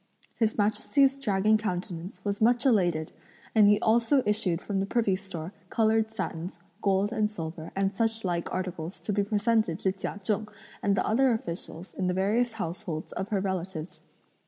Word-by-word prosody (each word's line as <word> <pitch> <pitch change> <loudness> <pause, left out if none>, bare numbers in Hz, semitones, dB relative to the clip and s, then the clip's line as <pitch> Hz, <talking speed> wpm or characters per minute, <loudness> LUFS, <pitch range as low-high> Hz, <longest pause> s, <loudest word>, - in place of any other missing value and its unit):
His 220 -2 0
Majesty's 270 +6 +2
dragon 215 -3 +3
countenance 180 -2 -4
was 200 +1 -1
much 240 +2 +4
elated, 175 -10 +2 0.4
and 215 -2 +6
he 205 0 +5
also 235 +4 +3
issued 205 -5 +1
from 195 0 -2
the 195 - -1
privy 215 -4 +2
store 185 -2 -7 0.2
coloured 220 -1 +2
satins, 175 -4 -4 0.2
gold 195 +1 +2
and 215 -2 +1
silver 165 -5 -6
and 195 0 0
such 225 0 0
like 170 -2 -1
articles 180 -1 -4
to 210 - -2
be 205 0 +2
presented 210 -3 +1
to 190 - +2
Chia 195 +1 -5
Cheng 210 +2 0 0.3
and 200 -1 +2
the - - +1
other 255 +4 +3
officials 170 -3 -5
in 185 - -1
the 180 - 0
various 220 +5 +1
households 170 -4 -4
of 190 - -3
her 205 -3 +1
relatives. 185 -3 -4
200 Hz, 170 wpm, -28 LUFS, 180-220 Hz, 0.4 s, and